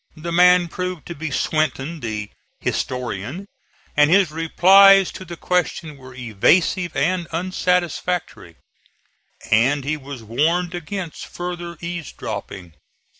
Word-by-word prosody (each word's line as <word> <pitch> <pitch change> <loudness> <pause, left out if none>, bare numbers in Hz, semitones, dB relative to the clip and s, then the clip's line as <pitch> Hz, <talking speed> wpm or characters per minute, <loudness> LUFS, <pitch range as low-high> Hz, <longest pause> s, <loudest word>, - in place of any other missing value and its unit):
The 170 +2 -5
man 180 +1 +5
proved 180 -1 -5
to 170 - -6
be 160 0 -5
Swinton, 155 +2 -1
the 105 -4 -5 0.3
"historian," 125 - -3 0.5
and 150 0 +5
his 185 -2 +4
replies 190 +4 +6
to - - -9
the 170 -1 -9
question 170 -4 -1
were 130 -2 -13
evasive 140 - +1
and 175 +2 0
unsatisfactory, 180 - -2 1.0
and 130 +6 +3
he 155 +3 -2
was 135 -4 -9
warned 165 +10 0
against 175 0 -6
further 175 -1 -6
eaves 170 -2 -5
dropping. 90 -4 -7
165 Hz, 120 wpm, -21 LUFS, 140-180 Hz, 1.0 s, replies